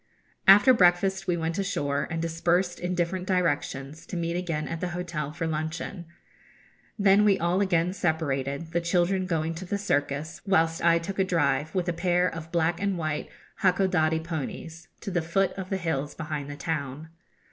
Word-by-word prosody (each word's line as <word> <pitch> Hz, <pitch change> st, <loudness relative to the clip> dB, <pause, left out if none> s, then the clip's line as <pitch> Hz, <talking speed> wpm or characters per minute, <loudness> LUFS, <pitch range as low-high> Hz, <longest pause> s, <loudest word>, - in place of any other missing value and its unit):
After 205 Hz, +7 st, +8 dB
breakfast 190 Hz, -1 st, +3 dB
we 175 Hz, -1 st, +1 dB
went 165 Hz, +3 st, -2 dB
ashore, 145 Hz, -8 st, -1 dB
and 165 Hz, -, -3 dB
dispersed 170 Hz, +2 st, 0 dB
in 180 Hz, +1 st, -2 dB
different 180 Hz, +1 st, -1 dB
directions, 150 Hz, -5 st, -1 dB
to 180 Hz, -, -4 dB
meet 170 Hz, 0 st, -1 dB
again 165 Hz, -4 st, -2 dB
at 165 Hz, -1 st, -5 dB
the 180 Hz, -, -1 dB
hotel 165 Hz, -5 st, -3 dB
for 165 Hz, +2 st, -4 dB
luncheon. 160 Hz, +3 st, -4 dB, 0.9 s
Then 200 Hz, 0 st, +5 dB
we 200 Hz, -2 st, +4 dB
all 175 Hz, +2 st, +1 dB
again 180 Hz, -2 st, +2 dB
separated, 160 Hz, -3 st, -1 dB
the 170 Hz, -, 0 dB
children 180 Hz, +2 st, +1 dB
going 165 Hz, -2 st, -1 dB
to 170 Hz, +3 st, -7 dB
the 200 Hz, +3 st, -2 dB
circus, 150 Hz, -5 st, -1 dB
whilst 165 Hz, -5 st, +2 dB
I 170 Hz, 0 st, +5 dB
took 190 Hz, +4 st, -5 dB
a -, -, +5 dB
drive, 155 Hz, -4 st, 0 dB
with 180 Hz, -1 st, 0 dB
a 175 Hz, -, +1 dB
pair 175 Hz, +1 st, +2 dB
of 165 Hz, -2 st, -6 dB
black 170 Hz, 0 st, +1 dB
and 200 Hz, -2 st, 0 dB
white 155 Hz, -2 st, -3 dB, 0.3 s
Hakodadi 180 Hz, -4 st, +2 dB
ponies, 165 Hz, +1 st, -6 dB
to 200 Hz, -, -5 dB
the 175 Hz, -2 st, +1 dB
foot 180 Hz, +4 st, +1 dB
of 190 Hz, -1 st, -6 dB
the 195 Hz, -, 0 dB
hills 150 Hz, -5 st, -2 dB
behind 150 Hz, -3 st, -4 dB
the 145 Hz, -, -5 dB
town. 150 Hz, -1 st, -4 dB
170 Hz, 180 wpm, -27 LUFS, 160-185 Hz, 0.9 s, After